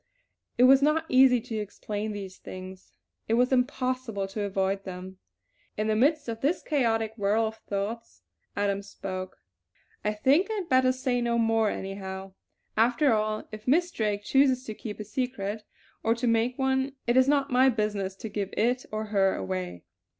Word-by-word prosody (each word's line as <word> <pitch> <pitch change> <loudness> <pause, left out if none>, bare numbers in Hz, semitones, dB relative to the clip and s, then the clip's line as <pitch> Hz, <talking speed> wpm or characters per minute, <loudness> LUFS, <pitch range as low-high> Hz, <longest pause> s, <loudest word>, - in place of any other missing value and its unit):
It 245 - +5
was 265 +2 +7
not 305 +3 +2
easy 255 -1 +6
to 220 0 -5
explain 210 +1 -4
these 195 -2 -7
things; 185 - -10 0.4
it 225 - +2
was 250 +2 +3
impossible 255 -5 0
to 210 +2 -4
avoid 195 -1 -1
them. 185 0 -8 0.6
In 215 - 0
the 215 0 +1
midst 285 +5 +2
of 230 -1 -4
this 310 +6 0
chaotic 225 -6 +1
whirl 210 +2 +2
of 220 0 -4
thoughts 215 +2 -5 0.3
Adams 200 0 -1
spoke: 185 -1 -6 0.7
"I 210 - 0
think 280 - +3
I 440 - -1
had 385 -5 -4
better 255 -1 +4
say 255 -1 -1
no 235 0 +1
more, 225 -1 +2
anyhow. 190 -1 -6 0.4
After 240 +4 +3
all, 215 0 -1
if 215 +1 -9
Miss 345 +7 +3
Drake 210 -2 -1
chooses 265 +1 +3
to 220 - -6
keep 210 0 -7
a - - -3
secret, 215 -2 -3 0.4
or 225 +1 +2
to 240 +1 -3
make 230 +2 +2
one, 265 0 0
it 240 - +2
is 260 0 +5
not 280 -2 +2
my 255 +2 +5
business 210 -5 -1
to 220 - -7
give 200 -2 -3
it, 245 +4 +1
or 215 0 -2
her, 195 -1 +3
away. 90 -2 -4
220 Hz, 175 wpm, -27 LUFS, 200-255 Hz, 0.7 s, was